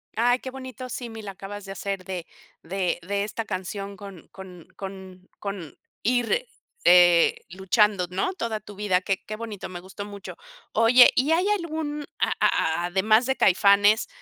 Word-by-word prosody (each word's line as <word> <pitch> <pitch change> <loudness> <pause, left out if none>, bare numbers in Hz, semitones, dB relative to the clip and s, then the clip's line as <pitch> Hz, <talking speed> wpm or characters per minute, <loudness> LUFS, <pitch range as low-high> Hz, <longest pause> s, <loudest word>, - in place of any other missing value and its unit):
Ay, 245 +3 +3
qué 260 - -7
bonito, 260 -1 -8
símil 225 -3 -7
acabas 195 +1 -8
de 195 - -8
hacer 195 -1 -4
de 180 -3 -5 0.4
de 180 0 -2
de 200 0 0
esta 220 +1 -4
canción 195 +1 -5
con 195 -3 -11
con 180 -3 -12
con 190 -1 -9
con 195 -7 -6 0.3
ir, 245 - +1 0.4
eh, 175 -1 +6
luchando, 190 +1 +2
¿no?, 190 - -1
toda 230 - -3
tu 205 0 -12
vida, 190 -2 +1
qué 190 0 -2
qué 215 - -5
bonito, 215 -3 -7
me 180 -1 -7
gustó 190 +2 -8
mucho. 200 -2 -9 0.4
Oye, 235 +3 +7
¿y 275 +5 +2
hay 355 +4 +3
algún, 315 -6 -2
a - - +1
a 160 +2 +1
además 215 +6 +3
de 265 +1 0
Caifanes, 200 +2 +4
200 Hz, 160 wpm, -25 LUFS, 190-230 Hz, 0.4 s, Oye